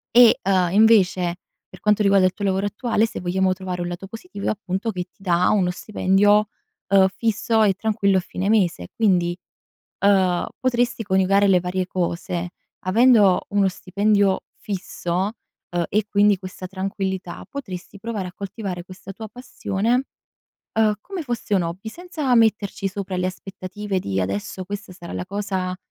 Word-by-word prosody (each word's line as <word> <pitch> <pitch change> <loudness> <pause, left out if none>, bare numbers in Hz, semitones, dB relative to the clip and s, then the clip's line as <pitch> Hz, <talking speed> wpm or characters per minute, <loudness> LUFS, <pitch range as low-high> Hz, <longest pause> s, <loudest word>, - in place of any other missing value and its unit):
e, 240 -1 +8
uhm, 185 -3 +2
invece, 190 -5 +4 0.3
per - - -13
quanto 210 0 +2
riguarda 195 -2 +5
il 185 - +2
tuo 205 - -7
lavoro 195 0 +1
attuale, 220 +2 +1
se 225 - -6
vogliamo 185 +1 +1
trovare 185 -1 -5
un 175 - -2
lato 175 +2 -6
positivo 225 - -7
è - - +3
appunto, 205 +1 -2
che 180 -3 -3
ti 190 - -23
dà 180 -1 +2
uno 190 -4 +2
stipendio, 205 +2 +2 0.4
uhm, 195 -1 +6
fisso 225 0 +1
e 200 -2 +4
tranquillo 200 -1 +1
a - - +4
fine 185 +2 -3
mese. 175 - +1
Quindi, 175 -5 +2 0.7
uhm, 185 -3 +3
potresti 245 -2 +1
coniugare 195 0 +3
le 190 -2 +5
varie 180 +1 -2
cose. 175 -1 -2 0.4
Avendo 210 -2 +5
uno 200 -1 +3
stipendio 200 +1 +1 0.2
fisso, 190 -1 -3 0.4
uhm, 175 -1 0
e 215 +1 +1
quindi 205 0 +4
questa 185 0 -8
tranquillità, 190 -1 -4
potresti 200 -8 -7
provare 205 -3 -4
a - - -11
coltivare 195 -2 -6
questa 185 +1 -10
tua 220 +3 -8
passione, 240 0 -1 0.7
uhm, 215 -1 +4
come 390 -1 -6
fosse 240 -6 -2
un 190 - +4
hobby, 180 +6 -5
senza 315 -5 -2
metterci 215 -4 +2
sopra 195 -1 -4
le 180 - 0
aspettative 195 +1 -4
di: 95 - -2
"Adesso 100 - -3
questa 200 0 -7
sarà 175 -2 -9
la 180 - -4
cosa 190 -2 -3
195 Hz, 160 wpm, -22 LUFS, 185-210 Hz, 0.7 s, e